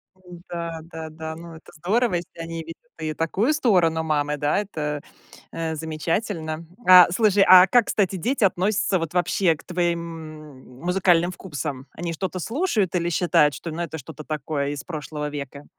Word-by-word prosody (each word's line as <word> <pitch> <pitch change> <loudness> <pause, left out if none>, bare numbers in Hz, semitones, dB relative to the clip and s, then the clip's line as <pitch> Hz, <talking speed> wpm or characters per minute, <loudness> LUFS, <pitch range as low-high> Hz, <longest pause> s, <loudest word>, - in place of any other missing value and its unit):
Да-да-да. 165 -3 -7
Ну, 165 0 -10
это 160 - -15
здорово, 200 +7 +1
если 170 -1 -6
они 165 0 -5
видят 165 +1 -9 0.2
и 155 -1 -3
такую 190 - 0
сторону 180 - +2
мамы, 150 -2 0
да, 145 +5 +1
это, 150 -8 -3 0.5
э, 165 -1 -3
замечательно. 160 +1 -3 0.2
А, 180 -1 +9
слушай, 205 -2 +4
а 185 0 +10
как, 240 +2 +4
кстати, 195 -2 0
дети 235 +7 -1
относятся 195 +1 +2
вот 165 -1 -4
вообще 180 -1 +2
к 150 - -16
твоим 160 -6 -5
музыкальным 180 -1 +2
вкусам? 145 -7 -6
Они 170 0 -4
что-то 185 +2 -4
слушают 225 - 0
или 170 -1 0
считают, 160 -4 +3
что, 165 +5 -6
ну, 165 +2 -4
это 165 -2 -4
что-то 155 +2 -10
такое 145 -1 -2
из 145 -2 -5
прошлого 150 -2 -5
века? 145 0 -7
165 Hz, 155 wpm, -23 LUFS, 155-185 Hz, 0.5 s, а